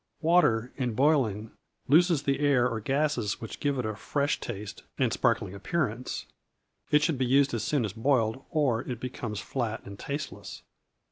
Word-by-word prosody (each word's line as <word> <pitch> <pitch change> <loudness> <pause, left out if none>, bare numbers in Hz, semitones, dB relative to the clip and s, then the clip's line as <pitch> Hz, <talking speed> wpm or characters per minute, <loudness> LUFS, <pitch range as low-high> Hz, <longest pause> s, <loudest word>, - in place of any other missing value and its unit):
Water, 155 -9 +3
in 125 -5 -1
boiling, 120 -7 +2 0.4
loses 165 0 +4
the 140 -1 0
air 140 -4 +3
or 115 -2 -2
gases 135 -3 0
which 115 - -7
give 140 -1 0
it 125 - -1
a 110 -1 -2
fresh 145 +6 -1
taste 105 -3 -6 0.2
and - - +1
sparkling 90 - +1
appearance. 120 +3 -2 0.6
It 150 0 +4
should 150 -3 +1
be 130 - +2
used 140 +1 +4
as 115 - -1
soon 140 -6 +1
as 100 - -4
boiled, 120 0 +1
or 135 -7 +1
it 125 -2 -5
becomes 120 -4 -5
flat 115 +1 -3
and 100 0 -9
tasteless. 145 +2 -6
125 Hz, 165 wpm, -28 LUFS, 110-145 Hz, 0.6 s, loses